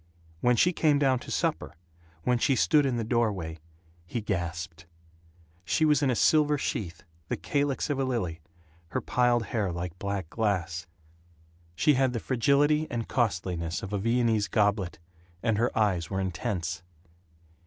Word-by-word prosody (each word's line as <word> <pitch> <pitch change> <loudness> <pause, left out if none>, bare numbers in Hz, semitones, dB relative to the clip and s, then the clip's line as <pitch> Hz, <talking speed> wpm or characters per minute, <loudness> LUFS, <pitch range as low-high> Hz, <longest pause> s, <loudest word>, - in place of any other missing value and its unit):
When 125 +6 +3
she 180 +9 +3
came 150 -3 +3
down 135 -3 +2
to - - -11
supper, - - -1 0.5
when 125 -1 +2
she 135 +2 +2
stood 145 +2 +4
in 125 -3 -1
the 115 - -1
doorway, 105 -9 -1 0.5
he 120 - -3
gasped. 85 -5 -4 0.8
She 155 - +1
was 150 -2 +4
in 140 - +2
a 125 - +2
silver 150 +3 +4
sheath, 90 - -4 0.2
the - - -2
calyx 140 - -1
of 145 -3 -1
a - - +2
lily, 95 -11 -2 0.5
her 85 - -2
piled 120 -2 +2
hair 105 -5 0
like 85 0 -5
black 100 -3 -3
glass; 90 -6 -1 0.9
she 150 - +4
had 130 -1 +2
the 115 - -1
fragility 140 +6 +2
and 115 -2 -3
costliness 90 -7 -1
of 100 +1 -6
a 100 - 0
Viennese 115 -1 +1
goblet; 100 -2 +1 0.5
and 110 -3 +1
her 120 - +3
eyes 95 -7 +1
were 95 - -2
intense. 90 -2 -3
110 Hz, 155 wpm, -28 LUFS, 90-130 Hz, 0.9 s, stood